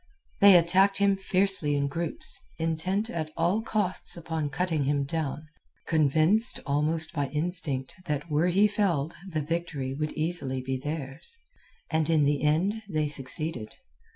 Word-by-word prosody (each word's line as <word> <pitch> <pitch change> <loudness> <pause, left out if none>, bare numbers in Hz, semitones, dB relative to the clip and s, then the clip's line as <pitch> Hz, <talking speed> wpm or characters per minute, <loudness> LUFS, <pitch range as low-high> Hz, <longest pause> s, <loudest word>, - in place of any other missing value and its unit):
They 200 -1 +8
attacked 190 +4 +3
him 200 -1 +2
fiercely 190 -5 +2
in 140 0 0
groups, 165 +3 -1 0.2
intent 165 +6 -2
at 160 -2 -4
all 175 +6 +1
costs 205 -6 +1
upon 160 -3 -4
cutting 160 -1 -1
him 140 0 0
down, 155 0 -4 0.4
convinced 160 - +3
almost 155 +3 -1
by 145 -3 -2
instinct 150 -3 -1
that 150 -1 -3
were 155 +2 +1
he 195 +4 +3
felled 175 -8 -1 0.2
the 155 -3 -2
victory 150 -4 -4
would 150 +2 -4
easily 155 -5 -1
be 130 +1 -4
theirs. 145 - 0 0.5
And 160 -1 0
in 160 -2 +3
the 145 0 +1
end 175 +9 0
they 155 -4 -1
succeeded. 145 -3 -1
160 Hz, 145 wpm, -27 LUFS, 145-180 Hz, 0.5 s, They